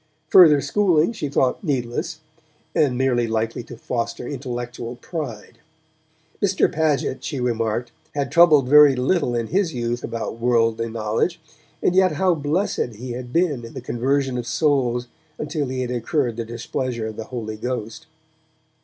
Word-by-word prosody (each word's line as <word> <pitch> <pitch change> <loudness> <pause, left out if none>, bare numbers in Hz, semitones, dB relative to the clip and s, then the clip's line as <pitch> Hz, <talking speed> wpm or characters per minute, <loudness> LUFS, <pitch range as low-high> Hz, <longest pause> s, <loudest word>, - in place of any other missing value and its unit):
Further 155 -6 +8
schooling 175 - +2
she 150 -10 -4
thought 135 +2 +1
needless, 140 +1 -2 0.5
and 130 -5 +2
merely 125 -2 +1
likely 110 +1 -1
to 120 - -10
foster 120 +1 -3
intellectual 120 -3 -5
pride. 125 - -7 0.8
Mr. 195 -2 +2
Paget, 150 -4 0
she 140 - -3
remarked, 120 -1 -1 0.2
had 140 -1 -1
troubled 155 -6 +6
very 145 0 +7
little 130 0 +1
in 115 -1 0
his 180 - 0
youth 120 0 -2
about 115 0 -4
worldly 115 -1 +1
knowledge, 115 +10 -1 0.4
and 180 - +3
yet 185 -2 +4
how 185 +3 +2
blessed 150 - -1
he 125 +4 -7
had 120 0 -6
been 160 -7 +1
in 115 - -10
the - - -4
conversion 130 +1 -1
of 120 - -5
souls 125 -4 +1 0.3
until 150 -1 -2
he 130 0 -3
had 125 -1 -3
incurred 120 0 -1
the 115 0 -4
displeasure 120 +1 -4
of 110 -1 -5
the 110 - -6
Holy 110 -4 -5
Ghost! 125 +6 -5
125 Hz, 155 wpm, -22 LUFS, 120-150 Hz, 0.8 s, Further